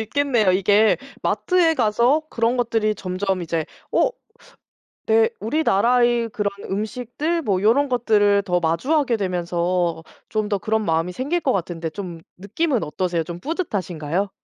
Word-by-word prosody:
있겠네요. 225 -4 +1
이게 205 +3 +4 0.3
마트에 350 -3 +2
가서 240 +5 +2
그런 230 +2 +1
것들이 225 -3 +1
점점 185 -1 -2
이제 165 -1 -2 0.3
어 - - +3 1.0
내 225 0 +4
우리나라의 240 -1 +2
그런 210 -1 -1 0.2
음식들 250 - -2
뭐 195 -6 0
요런 270 +7 +3
것들을 210 -5 +3
더 180 -3 0
마주하게 240 - +1
되면서 175 -2 -1 0.3
좀 215 -1 -1
더 205 - +1
그런 220 +2 -1
마음이 165 0 0
생길 290 - -2
것 265 - +1
같은데 170 -3 -3
좀 175 -4 -7 0.2
느낌은 220 - -1
어떠세요? 170 +2 -2
좀 170 +1 -7
뿌듯하신가요? 190 - -2
210 Hz, 310 characters per minute, -22 LUFS, 180-245 Hz, 1.0 s, 이게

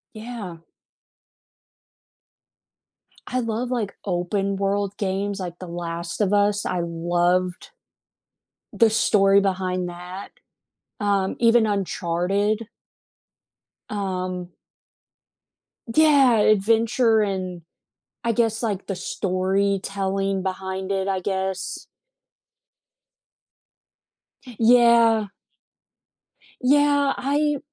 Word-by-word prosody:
Yeah. 215 -5 -7 2.7
I 255 - -1
love, 230 +2 -2
like, 225 -5 -2
open-world 195 +2 -1
games, 200 0 -2
like, 175 -2 -6
The 185 - -8
Last 170 +1 -5
of 200 -1 +2
Us, 205 0 +2
I 180 - -1
loved 175 - -1 1.0
the 230 -2 +4
story 200 -2 +4
behind 185 -2 -1
that, 180 +2 -8 0.7
um, 200 -2 0
even 230 -1 +4
Uncharted. 200 +2 -1 1.2
Um 185 -3 -3 1.5
Yeah, 280 -6 +5
adventure, 225 +2 +3
and, 185 -3 -3 0.6
I 235 - +2
guess, 225 -1 0
like, 205 -5 -3
the 195 - -3
storytelling 195 +1 -1
behind 190 0 -4
it, 195 -1 -1
I 195 -1 0
guess. 190 0 -3 2.7
Yeah. 230 -2 +5 1.3
Yeah, 285 +1 +3
I 290 +2 0
200 Hz, 80 wpm, -23 LUFS, 185-225 Hz, 2.7 s, Yeah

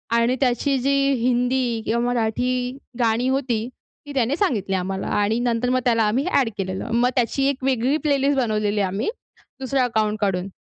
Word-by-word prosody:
आणि 235 +2 +2
त्याची 265 +2 +1
जी 275 +2 +1 0.2
हिंदी 245 -1 0
किंवा 235 +2 0
मराठी 240 0 0 0.5
गाणी 235 +1 +2
होती, 250 -4 -1 0.4
ती 290 - -8
त्याने 260 0 +1
सांगितली 210 - 0
आम्हाला 190 +1 -3
आणि 215 +3 +1
नंतर 240 0 0
मग 255 0 +2
त्याला 230 -2 +3
आम्ही 230 +7 +1
ॲड 260 -5 +3
केलेलं. 190 -1 -4
मग 240 +2 +3
त्याची 255 +2 +1
एक 275 -1 -4
वेगळी 260 +2 +1
प्लेलिस्ट 280 0 +2
बनवलेली 215 -3 0
आम्ही 195 - -1 0.5
दुसरं 265 0 0
अकाउंट 215 -3 0
काढून. 195 -2 0
240 Hz, 165 wpm, -22 LUFS, 215-260 Hz, 0.5 s, त्याला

